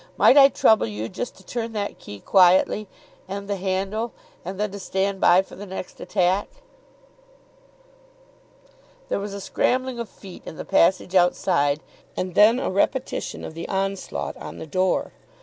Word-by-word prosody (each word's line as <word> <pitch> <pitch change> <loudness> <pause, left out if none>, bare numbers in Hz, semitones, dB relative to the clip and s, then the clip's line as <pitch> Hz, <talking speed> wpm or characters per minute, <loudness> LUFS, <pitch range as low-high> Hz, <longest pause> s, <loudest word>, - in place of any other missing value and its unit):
Might - - +6
I 275 -1 +9
trouble 220 - +3
you 105 +1 -4
just 245 - -6
to - - -17
turn 230 -1 -4
that 205 -1 -4
key 100 -1 -10
quietly, 190 +3 +4 0.4
and 200 +1 -6
the 200 - -1
handle, 195 +5 -2 0.3
and 185 +3 -6
then 210 -1 -1
to 200 - -7
stand 195 0 -2
by 180 +2 +6
for - - -14
the 205 +2 -9
next 185 -1 -8
attack." 190 0 +1 2.6
There - - 0
was 200 0 -5
a - - -5
scrambling 255 +5 -1
of 235 - -5
feet 190 -3 -12
in - - -9
the - - -6
passage 185 +1 +2
outside, 175 -5 +2 0.4
and 185 -1 -3
then 220 +6 +6
a 265 - -2
repetition 250 +7 -1
of - - -7
the 165 - -7
onslaught 195 0 -3
on - - -9
the - - -7
door. 185 +4 0
195 Hz, 165 wpm, -23 LUFS, 185-210 Hz, 2.6 s, I